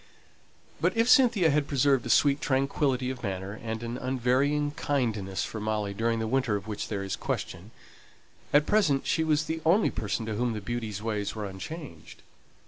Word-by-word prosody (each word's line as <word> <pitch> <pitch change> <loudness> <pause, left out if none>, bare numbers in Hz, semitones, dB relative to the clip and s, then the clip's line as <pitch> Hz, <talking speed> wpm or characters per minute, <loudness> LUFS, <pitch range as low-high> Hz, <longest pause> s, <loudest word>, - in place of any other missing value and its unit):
But - - +1
if 230 +1 +3
Cynthia 230 - +5
had 145 0 +1
preserved 135 -2 +2
a - - -5
sweet 140 +3 +4
tranquillity 135 -1 0
of 130 -2 -8
manner 95 -1 -4
and 110 0 -4
an 120 +1 -4
unvarying 130 +4 +1
kindness 110 -11 -1
for 110 - -6
Molly 105 -1 -2
during 115 +2 0
the 110 - -1
winter 120 -2 +1
of 100 -1 -4
which 105 -1 -4
there 100 -2 -3
is 95 - -3
question, 90 +6 -4 0.8
at 145 +1 +5
present 155 -10 +2
she 160 - +1
was 155 -1 +2
the 160 +1 -4
only 180 +7 +3
person 110 +1 -3
to 110 - -3
whom 120 +2 0
the 110 - -3
beauty's 110 -1 -4
ways 105 -2 -2
were 105 -1 -4
unchanged. 95 - -9
120 Hz, 180 wpm, -28 LUFS, 105-145 Hz, 0.8 s, Cynthia